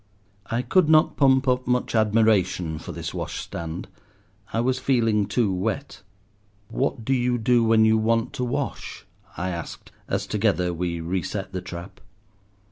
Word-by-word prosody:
I 120 +2 -1
could 160 +6 +3
not 155 -1 +5
pump 135 -1 +4
up 125 0 +1
much 125 0 0
admiration 105 -7 +2
for - - -8
this - - -6
washstand; 85 +1 -5 0.6
I 115 - -1
was 130 +2 +1
feeling 115 -6 +2
too 105 -2 +1
wet. 95 +9 -3 0.7
"What 115 - -2
do 135 - +2
you 125 -1 +1
do 120 +1 +3
when 110 -1 +4
you 110 0 +4
want 115 +1 +1
to 125 - -3
wash?" 135 +3 -4 0.3
I 95 +1 -2
asked, 85 -1 -7 0.2
as - - -1
together 90 -1 0
we 85 0 -2
reset 95 +3 -3
the 95 - -3
trap. 90 0 -9
110 Hz, 150 wpm, -24 LUFS, 95-125 Hz, 0.7 s, not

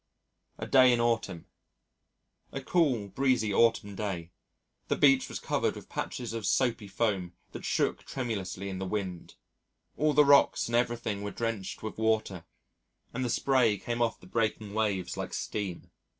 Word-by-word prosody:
A - - -5
Day 130 -2 +6
in 120 - +2
Autumn 115 -7 0 1.1
A 135 - -4
cool, 135 - +1
breezy 125 -3 +1
autumn 115 -2 +3
day. 95 -4 -4 0.6
The - - +1
beach 135 -2 +4
was - - -4
covered - - -1
with - - -11
patches 120 -2 -4
of 115 -3 -3
soapy 120 -5 +1
foam 95 -3 -1 0.2
that - - -8
shook - - 0
tremulously 100 -7 -4
in 95 -1 -5
the 95 - -3
wind 95 -4 -4 0.6
all 150 0 +2
the 150 +1 +6
rocks 140 0 +5
and 120 - -1
everything 120 -4 0
were 105 - -3
drenched 110 -2 -4
with 110 0 -6
water, 110 -6 0 0.7
and 130 - -2
the 125 - -1
spray 120 -4 +2
came 120 +4 -3
off 115 -1 0
the - - -16
breaking 110 0 -1
waves 105 -4 -1
like - - -4
steam. 100 -5 -4
110 Hz, 160 wpm, -29 LUFS, 100-120 Hz, 1.1 s, Day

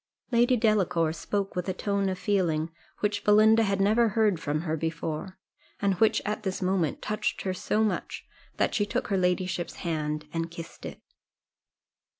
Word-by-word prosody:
Lady 240 +1 +4
Delacour 195 -8 +2
spoke 195 +5 -3
with 180 +1 -2
a 185 - -2
tone 200 0 0
of 185 - -2
feeling 170 -6 0 0.3
which 205 -1 0
Belinda 215 +2 +6
had 200 -3 +1
never 220 +4 +4
heard 210 -4 +2
from 150 -1 -1
her 160 -2 -1
before, 165 +3 -4 0.4
and 200 -1 +2
which 220 0 +3
at 210 +1 -2
this 190 -3 -3
moment 185 -5 0
touched 210 0 -2
her 190 - -1
so 210 +4 0
much, 215 - -2 0.3
that - - +1
she 210 - +2
took 205 - -2
her 195 - +1
ladyship's 180 -1 -1
hand 155 -2 -2
and 165 0 -2
kissed 165 0 -9
it. - - -9
190 Hz, 165 wpm, -27 LUFS, 165-210 Hz, 0.4 s, Belinda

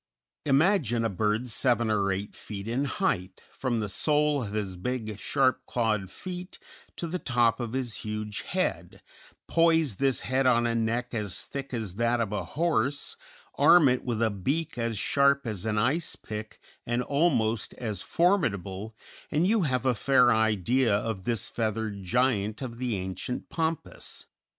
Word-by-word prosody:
Imagine 135 - +3
a - - +1
bird 105 +4 0
seven 120 -1 +2
or 100 -2 +2
eight 100 +2 -3
feet 100 -1 -7
in 125 +5 0
height 100 - -2
from 125 -3 -1
the 105 - -2
sole 150 +6 +2
of 105 -2 -6
his 100 -3 -2
big, 110 +1 -4
sharp 130 +5 +1
clawed 110 -5 0
feet, 180 - -7 0.4
to - - -3
the 175 +2 -3
top 120 -4 +2
of 120 -1 -4
his 130 -4 -1
huge 105 -1 -4
head, - - -3 0.4
poise 165 - +3
this 135 +1 +1
head 130 +1 +1
on 120 -1 +4
a 115 - +1
neck 115 +2 -1
as 105 -5 -2
thick 140 -1 -6
as 110 -6 -4
that 120 +1 +2
of 110 -3 -1
a 105 - -1
horse, 145 -3 0 0.4
arm 155 +2 +7
it 125 -1 +1
with 115 -2 -1
a 110 - +2
beak 145 - -2
as 115 -2 -2
sharp 140 +4 +3
as 110 -2 -4
an 105 - 0
icepick 110 -4 -2 0.3
and 120 +1 -1
almost 125 -8 +1
as 105 -6 -4
formidable, 110 - 0 0.3
and 155 +4 +2
you 215 +2 +3
have 130 -5 0
a 130 - +4
fair 125 +1 +4
idea 110 +2 +2
of 100 -3 -3
this 115 -4 0
feathered 110 -2 -2
giant 110 +2 0
of 120 -2 -6
the 125 -3 -1
ancient 95 +5 -5
pampas. 165 -1 -3
120 Hz, 160 wpm, -28 LUFS, 105-135 Hz, 0.4 s, arm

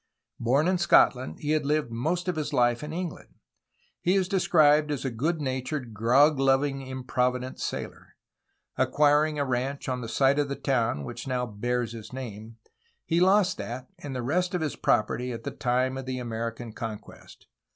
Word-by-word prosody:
Born 135 +7 +2
in 185 -1 +2
Scotland 80 - +3
he 150 - -1
had 155 -1 +2
lived 150 -3 0
most 160 +10 -1
of 180 - 0
his 150 -1 -3
life 120 -2 +2
in 150 - -6
England. 175 0 -6 0.6
He 180 +2 +2
is 190 -2 +2
described 155 -6 +4
as 140 -2 -3
a 135 - -1
good 155 +9 -1
natured, 130 -2 -3
grog 135 +7 +4
loving, 135 +1 +2
improvident 130 -1 -2
sailor. - - -6 0.6
Acquiring 150 +1 +3
a 145 - 0
ranch 130 +2 -2
on 125 -1 -2
the 115 - -6
site 135 +4 +3
of 145 -1 0
the 140 - -2
town 115 - 0
which 120 - -7
now 125 -1 -1
bears 120 +2 -2
his 115 -2 -9
name, 115 -3 -8 0.5
he 165 0 +1
lost 190 +1 +3
that 125 +2 -6
and 145 -5 -6
the 125 - -3
rest 180 +8 0
of 180 - -1
his 155 -2 -2
property 125 +4 0
at 115 -1 -6
the - - -4
time 130 +2 0
of 130 - -8
the 130 0 -2
American 115 -1 -5
conquest. 110 -1 -9
130 Hz, 180 wpm, -27 LUFS, 120-150 Hz, 0.6 s, described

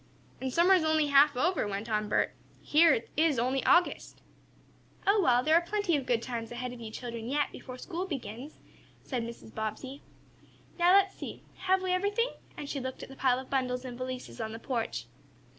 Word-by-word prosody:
"And 260 0 -2
summer 345 +7 +5
is 365 -4 +4
only 315 -1 +2
half 280 0 +6
over," 320 - +1
went 200 +2 -4
on 215 -2 -1
Bert. - - +1 0.3
"Here 320 +2 +5
it 225 - -1
is 310 -3 +3
only 255 +3 0
August." 350 -1 +2 0.9
"Oh, 405 +1 +4
well, 250 -6 +4
there 310 - +3
are 335 - +6
plenty 400 -1 0
of 275 -3 -2
good 235 -2 +1
times 235 -2 -5
ahead 245 +1 -4
of 240 - -10
you 225 - -6
children 235 0 -6
yet, 290 +1 0
before 255 -1 -9
school 355 +7 -4
begins," 265 - -7 0.4
said 255 -4 -3
Mrs. 230 -1 -8
Bobbsey. 220 +6 -5 0.8
"Now 350 +1 +5
let's 395 0 +5
see. - - -8
Have 375 0 +1
we 370 - 0
everything?" 410 +6 +1 0.3
and 290 - -6
she 280 - -3
looked 260 0 -5
at - - -9
the 270 - -10
pile 255 -2 +2
of 260 0 -8
bundles 255 -1 -1
and 250 -1 -6
valises 255 -1 -6
on 220 0 -4
the 225 - -7
porch. 230 -1 -3
265 Hz, 200 wpm, -30 LUFS, 240-335 Hz, 0.9 s, half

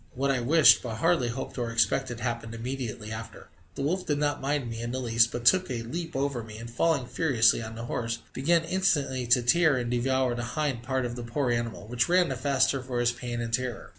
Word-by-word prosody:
What 140 +2 +1
I 130 - 0
wished, 150 +6 +6
but 115 -3 -5
hardly 165 +1 +2
hoped 125 +2 -5
or 120 -1 -2
expected, 120 +1 0
happened 115 -1 -3
immediately 115 -3 -5
after. 110 -5 -8 0.3
The 135 - -4
wolf 180 +6 -1
did 145 - +1
not 145 0 -1
mind 140 -1 -1
me 115 0 -6
in 120 - -4
the 130 - -3
least, 115 -2 +3
but 120 0 -5
took 185 +8 +4
a 120 -3 -3
leap 165 +8 -5
over 135 -2 -1
me, 110 -1 -10
and 115 +1 -8
falling 140 +1 +1
furiously 125 -6 +2
on 110 0 -7
the 115 +1 -6
horse, 115 -1 -3 0.2
began 165 +5 +2
instantly 150 -8 0
to 125 +1 +4
tear 155 +3 +4
and 120 -1 -2
devour 130 +1 +1
the 120 0 -4
hind 145 -6 -1
part 130 +1 -1
of 120 0 -4
the 120 - -6
poor 120 +2 -1
animal, 115 -3 -3
which 120 +3 0
ran 180 -1 +4
the 135 - -2
faster 135 0 +1
for 125 -1 -4
his 120 0 +2
pain 120 0 -5
and 115 -1 -5
terror. 125 -1 -2
125 Hz, 230 wpm, -27 LUFS, 115-140 Hz, 0.3 s, wished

